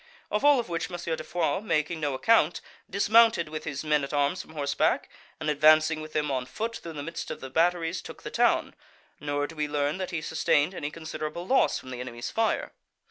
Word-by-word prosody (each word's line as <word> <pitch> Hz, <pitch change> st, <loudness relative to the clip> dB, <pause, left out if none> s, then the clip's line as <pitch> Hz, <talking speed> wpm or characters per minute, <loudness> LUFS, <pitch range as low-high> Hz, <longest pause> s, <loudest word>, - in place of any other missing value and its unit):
Of 210 Hz, -, 0 dB
all 285 Hz, -4 st, +5 dB
which 170 Hz, -4 st, -3 dB
M. 175 Hz, -, -5 dB, 0.2 s
de -, -, -7 dB
Foix 165 Hz, -4 st, 0 dB
making 160 Hz, -5 st, 0 dB
no 145 Hz, -3 st, -1 dB
account, 175 Hz, +2 st, +3 dB, 0.3 s
dismounted 215 Hz, -3 st, +4 dB
with 155 Hz, 0 st, -6 dB
his 145 Hz, -2 st, -4 dB
men 150 Hz, -2 st, +2 dB
at 140 Hz, -, -4 dB
arms 145 Hz, +5 st, +1 dB
from 160 Hz, -, -15 dB
horseback, 140 Hz, -2 st, 0 dB, 0.3 s
and, 155 Hz, -, -4 dB
advancing 155 Hz, +1 st, +4 dB
with 155 Hz, 0 st, -9 dB
them 150 Hz, -1 st, 0 dB
on 130 Hz, -2 st, -2 dB
foot 230 Hz, -, -4 dB
through 165 Hz, -, -8 dB
the 145 Hz, -2 st, -5 dB
midst 165 Hz, +3 st, -6 dB
of -, -, -5 dB
the 135 Hz, -, -8 dB
batteries, 165 Hz, +2 st, +1 dB
took -, -, -11 dB
the -, -, -6 dB
town; -, -, +2 dB, 0.5 s
nor 145 Hz, -1 st, -1 dB
do 165 Hz, -, -9 dB
we 150 Hz, -1 st, -1 dB
learn 145 Hz, +3 st, -1 dB
that 185 Hz, -, -3 dB
he 170 Hz, -4 st, -3 dB
sustained 160 Hz, +1 st, +1 dB
any 145 Hz, -5 st, -4 dB
considerable 160 Hz, +1 st, -6 dB
loss 265 Hz, +6 st, +3 dB
from 130 Hz, -, -9 dB
the 125 Hz, -, -6 dB
enemy's 120 Hz, -1 st, -6 dB
fire. 225 Hz, 0 st, 0 dB
155 Hz, 210 wpm, -27 LUFS, 145-175 Hz, 0.5 s, all